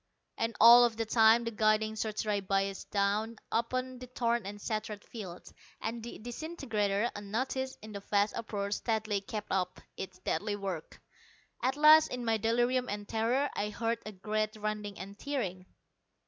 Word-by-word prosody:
And 230 -1 -2
all 240 +1 +9
the 225 0 -3
time 225 +1 +5
the 230 - -3
guiding 215 0 +2
search 215 0 -2
rays 205 -1 0
biased 195 0 -1
down 210 +3 0 0.2
upon 255 +2 -1
the 255 - -8
torn 235 -3 0
and 205 +1 -7
shattered 215 -1 -4
fields, 185 -6 -9 0.3
and 230 +1 -4
the 235 +1 -7
disintegrator, 235 -5 -2
unnoticed 260 +6 -3
in 215 - -8
the 200 - -5
vast 205 +1 +1
uproar, 200 -3 -3
steadily 215 -2 0
kept 210 +1 -6
up 185 -1 -1 0.2
its 185 -1 -6
deadly 205 +3 -1
work. 190 -5 -5 0.6
At 260 +2 0
last, 305 +1 +8
in 250 -1 -5
my 225 -1 +2
delirium 240 +3 +1
and 205 0 -4
terror, 235 +6 +1
I 210 - -1
heard 230 +2 -1
a 215 - -6
great 215 +2 -2
rending 210 -1 -4
and 200 +2 -9
tearing. 190 -11 -3
215 Hz, 160 wpm, -31 LUFS, 205-235 Hz, 0.6 s, all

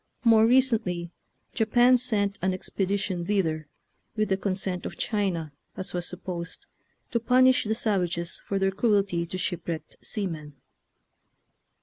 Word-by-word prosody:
More 225 -2 +6
recently 225 -9 +2 0.4
Japan 240 +3 +4
sent 205 -5 0
an 185 0 +1
expedition 190 -1 -2
thither, 165 -6 0 0.5
with 215 -1 0
the 190 - +3
consent 190 -2 -2
of - - -6
China, 185 -8 -1 0.3
as 190 - -4
was 175 -1 -1
supposed, 175 -2 -5 0.5
to 235 - +1
punish 255 +2 +4
the 220 +1 0
savages 180 -6 -1
for 195 - -2
their 195 0 +2
cruelty 195 -5 +1
to 185 - -4
shipwrecked 170 -2 -4
seamen. 160 -9 -4
195 Hz, 125 wpm, -27 LUFS, 175-220 Hz, 0.5 s, More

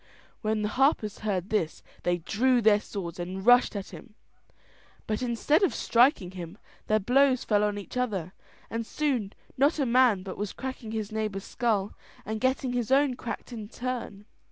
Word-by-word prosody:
When 215 -1 0
the 210 - 0
harpers 250 -4 +1
heard 195 -2 -2
this, 175 -7 -1 0.2
they 175 0 +1
drew 245 +9 +2
their 215 -2 +5
swords 180 -6 -6
and 185 +2 -5
rushed 245 -1 +6
at 200 -1 -5
him, 225 -4 -12 0.9
but 215 +1 -2
instead 250 - +2
of 385 - +2
striking 235 - +3
him, 180 0 -8 0.3
their 215 - +3
blows 255 +4 +3
fell 210 -1 +2
on 205 -1 0
each 205 - -8
other, 195 -8 -2 0.3
and 230 0 -3
soon 245 -6 -1 0.2
not 285 +5 +3
a 280 - +1
man 240 -5 +4
but 190 -1 -7
was 205 -1 -3
cracking 260 -4 -6
his 220 -2 -3
neighbour's 215 -3 -3
skull 210 -4 -1 0.3
and 220 0 -4
getting 260 -1 0
his 245 0 -2
own 275 0 +4
cracked 245 0 -6
in 215 -3 -7
turn. 240 -5 -5
220 Hz, 175 wpm, -28 LUFS, 200-250 Hz, 0.9 s, rushed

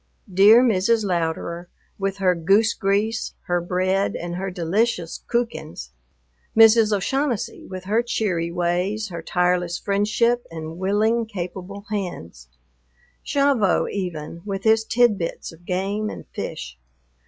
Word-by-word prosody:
Dear 210 +6 +7
Mrs. 220 -1 +2
Louderer, 170 -1 -2 0.3
with 195 0 -2
her 185 -2 +3
goose 195 +6 +3
grease, 210 +2 -1
her 175 0 0
bread, 185 +3 0
and 175 0 -5
her 190 +2 -3
delicious 180 +1 -1
"kuchens." 190 - -3 0.7
Mrs. 225 -1 +7
O'Shaughnessy, 240 +4 -1
with 185 -1 -7
her 210 +5 +1
cheery 185 -8 -1
ways, 180 +5 -1
her 170 -2 -6
tireless 180 0 0
friendship, 210 +5 +1
and 160 +1 -7
willing, 215 +4 +1
capable 195 +1 -7
hands. 85 - -5 0.8
Gavotte 275 -8 +2
even, 170 -4 -5
with 195 -2 -4
his 220 0 +4
tidbits 220 -7 +1
of 165 +1 -17
game 200 +4 -1
and - - -8
fish. 60 0 -6
195 Hz, 120 wpm, -23 LUFS, 175-220 Hz, 0.8 s, Dear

